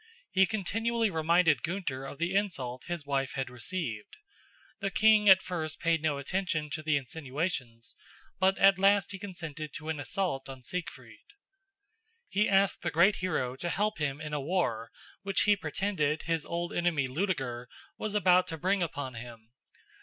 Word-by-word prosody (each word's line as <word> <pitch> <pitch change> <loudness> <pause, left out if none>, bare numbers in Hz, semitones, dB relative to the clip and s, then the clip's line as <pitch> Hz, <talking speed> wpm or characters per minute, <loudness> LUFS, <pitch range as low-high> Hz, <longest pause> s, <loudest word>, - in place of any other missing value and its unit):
He 190 0 +4
continually 225 +2 0
reminded 165 -3 +3
Gunther 160 - -3
of 135 - -8
the 170 +4 -1
insult 135 -12 -2
his 175 -4 -4
wife 135 -2 -1
had 135 -2 -3
received. 125 - -4 0.6
The 195 - -1
king 215 0 +5
at 190 0 +8
first 160 -4 -4
paid 165 -2 +1
no 155 -2 0
attention 155 0 -2
to 155 - -3
the 155 -1 +2
insinuations, 135 -4 -4 0.4
but 190 +1 +3
at 195 -1 +5
last 200 +2 +4
he 195 - -7
consented 160 -6 -7
to 155 +1 -7
an 155 -2 -2
assault 145 -3 -2
on 130 -1 -9
Siegfried. 180 +6 -6 1.1
He 210 +2 +2
asked 195 0 +3
the - - -1
great 180 +6 +4
hero 130 -9 -1
to 175 +5 -3
help 205 +2 0
him 145 -2 -1
in 150 -1 -6
a 145 - -1
war 135 -8 -1 0.3
which 195 -1 +1
he 210 - +5
pretended 160 -3 -1
his 165 -2 -1
old 170 0 -3
enemy 170 -6 +1
Ludeger 130 -5 -2 0.3
was 215 -1 -3
about 185 -3 +4
to 160 - -4
bring 190 +4 +1
upon 145 -6 -3
him. 115 -1 -10
165 Hz, 165 wpm, -30 LUFS, 140-190 Hz, 1.1 s, at